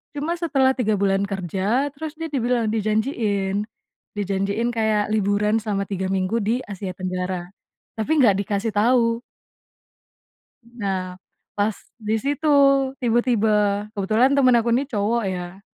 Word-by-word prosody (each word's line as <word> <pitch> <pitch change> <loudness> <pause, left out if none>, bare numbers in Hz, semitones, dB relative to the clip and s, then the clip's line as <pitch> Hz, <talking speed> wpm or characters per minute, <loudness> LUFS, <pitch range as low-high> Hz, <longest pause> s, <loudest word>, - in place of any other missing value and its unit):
Cuma 295 +3 -2
setelah 275 -6 +2
3 215 -3 +2
bulan 195 0 +2
kerja 195 - -1
terus 300 +2 -6
dia 325 - -3
dibilang 245 -3 0
dijanjiin. 215 -2 -1 0.5
Dijanjiin 200 +3 -1
kayak 220 -2 +2
liburan 210 0 +1
selama 205 -2 -2
3 190 -1 -2
minggu 185 +3 -1
di 235 +3 +1
Asia 195 -1 -5
Tenggara, 185 -1 -3 0.5
tapi 220 +7 -2
enggak 225 -8 +5
dikasih 205 +2 -1
tahu. 230 +1 +3 1.4
Nah, 195 -6 -4 0.4
pas 205 +1 +1 0.3
di 215 0 0
situ 285 +6 -1 0.5
tiba-tiba, 235 -2 +2 0.4
kebetulan 220 +5 +2
temen 255 -3 +5
aku 235 0 +1
ini 255 +4 +2
cowok 225 0 0
ya. 180 0 -5
215 Hz, 125 wpm, -22 LUFS, 195-240 Hz, 1.4 s, enggak